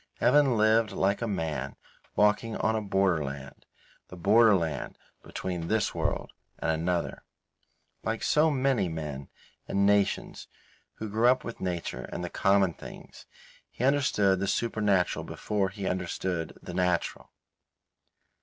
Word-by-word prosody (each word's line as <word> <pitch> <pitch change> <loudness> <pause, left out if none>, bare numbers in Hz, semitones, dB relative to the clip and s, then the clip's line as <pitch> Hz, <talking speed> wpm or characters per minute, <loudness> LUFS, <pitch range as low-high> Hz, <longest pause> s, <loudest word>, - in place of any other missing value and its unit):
Evan 130 -1 +4
lived 110 0 +3
like 100 +3 0
a 115 - -1
man 80 - -3 0.4
walking 105 +2 +2
on 110 0 +1
a 110 - 0
borderland, 85 -9 -1 0.4
the - - -10
borderland 100 - +3 0.2
between 90 -3 -5
this 110 +1 +1
world - - -2 0.3
and 80 - -1
another. 85 +2 -2 0.8
Like 110 0 -2
so 155 +1 +4
many 130 - +1
men 75 -4 -6 0.4
and 100 0 +1
nations 100 -1 +1 0.5
who 110 - -5
grow 110 +4 +4
up 130 - 0
with 115 - -7
nature 90 -2 -4
and 90 - -4
the 90 - -5
common 95 -2 +3
things, - - -12 0.4
he - - -6
understood 125 -9 +3
the 100 - -1
supernatural 105 -4 +1
before 100 -3 -2
he 100 0 -7
understood 90 -2 -3
the 90 - -7
natural. 90 -2 -1
100 Hz, 130 wpm, -28 LUFS, 85-110 Hz, 0.8 s, Evan